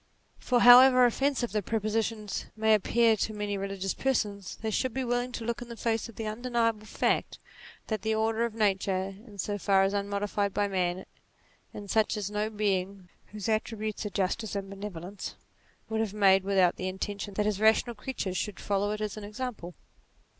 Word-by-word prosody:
For 245 Hz, -2 st, +1 dB
however 250 Hz, +1 st, +9 dB
offensive 260 Hz, 0 st, 0 dB
the 210 Hz, -, 0 dB
proposition 215 Hz, +1 st, -1 dB, 0.3 s
may 220 Hz, 0 st, +3 dB
appear 225 Hz, +2 st, +3 dB
to 215 Hz, +2 st, -2 dB
many 205 Hz, -1 st, -2 dB
religious 195 Hz, -1 st, -3 dB
persons, 205 Hz, -7 st, -1 dB
they 220 Hz, 0 st, -4 dB
should 255 Hz, +3 st, -1 dB
be 265 Hz, -, -1 dB
willing 245 Hz, 0 st, -1 dB
to 230 Hz, -, -5 dB
look 235 Hz, 0 st, -2 dB
in 240 Hz, -, -8 dB
the 235 Hz, -, -8 dB
face 225 Hz, -1 st, -1 dB
the 225 Hz, -1 st, -7 dB
undeniable 230 Hz, -1 st, -1 dB
fact, -, -, 0 dB, 0.5 s
that 215 Hz, -3 st, -3 dB
the 220 Hz, 0 st, 0 dB
order 220 Hz, +1 st, +1 dB
of 235 Hz, -2 st, -2 dB
nature, 195 Hz, -3 st, +1 dB, 0.2 s
in 205 Hz, -2 st, -13 dB
so 205 Hz, +2 st, -2 dB
far 195 Hz, 0 st, +3 dB
as 195 Hz, +1 st, +1 dB
unmodified 200 Hz, 0 st, -1 dB
by 205 Hz, 0 st, +2 dB
man, 185 Hz, -1 st, -1 dB, 0.7 s
is 205 Hz, -2 st, -7 dB
such 220 Hz, 0 st, +2 dB
as 205 Hz, -1 st, -3 dB
no 210 Hz, +1 st, -1 dB
being, 195 Hz, -3 st, -2 dB, 0.2 s
whose 210 Hz, -2 st, -6 dB
attributes 220 Hz, -1 st, -2 dB
are 210 Hz, -, -3 dB
justice 205 Hz, +2 st, -2 dB
and 195 Hz, -1 st, -4 dB
benevolence, 195 Hz, -1 st, -7 dB, 0.5 s
would 220 Hz, 0 st, -2 dB
have 210 Hz, -2 st, -3 dB
made, 195 Hz, -2 st, +5 dB
with 195 Hz, 0 st, -1 dB, 0.2 s
the 185 Hz, -, -3 dB
intention 200 Hz, +1 st, -4 dB
that 210 Hz, -, +1 dB
his 210 Hz, -2 st, 0 dB
rational 220 Hz, +2 st, +3 dB
creatures 205 Hz, -5 st, -4 dB
should 210 Hz, -1 st, -3 dB
follow 200 Hz, 0 st, 0 dB
it 215 Hz, -, -5 dB
as 215 Hz, 0 st, -3 dB
an 215 Hz, -, -7 dB
example. 210 Hz, -4 st, -6 dB
210 Hz, 180 wpm, -29 LUFS, 200-225 Hz, 0.7 s, however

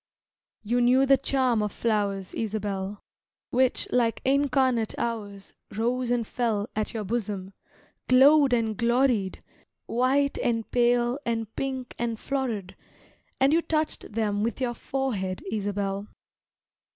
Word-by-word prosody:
You 240 Hz, +3 st, +1 dB
knew 255 Hz, +2 st, +5 dB
the 275 Hz, 0 st, +6 dB
charm 260 Hz, -4 st, +1 dB
of 210 Hz, -1 st, -1 dB
flowers, 200 Hz, -4 st, -1 dB
Isabel, 205 Hz, -2 st, -3 dB, 0.5 s
Which, 255 Hz, +1 st, +2 dB
like 235 Hz, -2 st, +2 dB
incarnate 260 Hz, -4 st, +2 dB
hours, 205 Hz, -4 st, -4 dB, 0.2 s
Rose 245 Hz, +2 st, 0 dB
and 240 Hz, -2 st, +1 dB
fell 220 Hz, -3 st, -1 dB
At 215 Hz, 0 st, -1 dB
your 220 Hz, -, -2 dB
bosom, 200 Hz, -3 st, -3 dB, 0.6 s
glowed 275 Hz, +2 st, +6 dB
and 225 Hz, -3 st, +1 dB
gloried, 235 Hz, -3 st, +1 dB, 0.4 s
White 270 Hz, +4 st, +1 dB
and 230 Hz, -2 st, 0 dB
pale 240 Hz, +1 st, +2 dB
and 225 Hz, -2 st, -3 dB
pink 260 Hz, -2 st, -3 dB
and 230 Hz, -2 st, -2 dB
florid, 240 Hz, -9 st, -3 dB, 0.6 s
And 270 Hz, +2 st, +4 dB
you 335 Hz, -, +4 dB
touched 315 Hz, -5 st, -2 dB
them 205 Hz, -2 st, 0 dB
with 230 Hz, +3 st, -1 dB
your 250 Hz, -2 st, -1 dB
forehead, 220 Hz, -8 st, -3 dB
Isabel. 200 Hz, -1 st, -2 dB
235 Hz, 125 wpm, -26 LUFS, 210-255 Hz, 0.6 s, the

